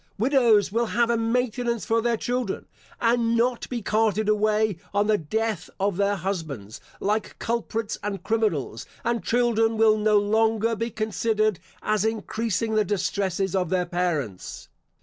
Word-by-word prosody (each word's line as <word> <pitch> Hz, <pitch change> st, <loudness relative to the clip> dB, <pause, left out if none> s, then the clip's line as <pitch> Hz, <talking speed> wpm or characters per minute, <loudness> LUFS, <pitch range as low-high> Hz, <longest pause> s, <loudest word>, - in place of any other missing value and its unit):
Widows 225 Hz, -5 st, +3 dB
will 230 Hz, +2 st, +1 dB
have 235 Hz, +1 st, +1 dB
a -, -, +2 dB
maintenance 235 Hz, 0 st, 0 dB
for 225 Hz, 0 st, +2 dB
their 235 Hz, 0 st, +1 dB
children, 245 Hz, -3 st, -2 dB, 0.3 s
and 230 Hz, 0 st, +2 dB
not 240 Hz, +1 st, 0 dB
be 240 Hz, -4 st, -4 dB
carted 215 Hz, 0 st, +1 dB
away, 215 Hz, -2 st, +2 dB, 0.2 s
on 205 Hz, +1 st, +3 dB
the 215 Hz, 0 st, +3 dB
death 215 Hz, +4 st, -2 dB
of 195 Hz, -1 st, +1 dB
their 200 Hz, 0 st, +2 dB
husbands, 160 Hz, -, -5 dB, 0.2 s
like 210 Hz, +2 st, -1 dB
culprits 230 Hz, -2 st, -2 dB
and 200 Hz, -3 st, -4 dB
criminals; 205 Hz, -, -1 dB, 0.2 s
and 235 Hz, 0 st, -1 dB
children 225 Hz, -2 st, +2 dB
will 215 Hz, -1 st, +4 dB
no 210 Hz, 0 st, +4 dB
longer 220 Hz, +2 st, +2 dB
be 230 Hz, +2 st, -2 dB
considered 215 Hz, -2 st, 0 dB, 0.2 s
as 215 Hz, -2 st, +1 dB
increasing 220 Hz, 0 st, -1 dB
the 215 Hz, 0 st, +3 dB
distresses 195 Hz, -1 st, -1 dB
of 180 Hz, -3 st, 0 dB
their 180 Hz, 0 st, +1 dB
parents. 170 Hz, -, -3 dB
215 Hz, 150 wpm, -25 LUFS, 200-230 Hz, 0.3 s, will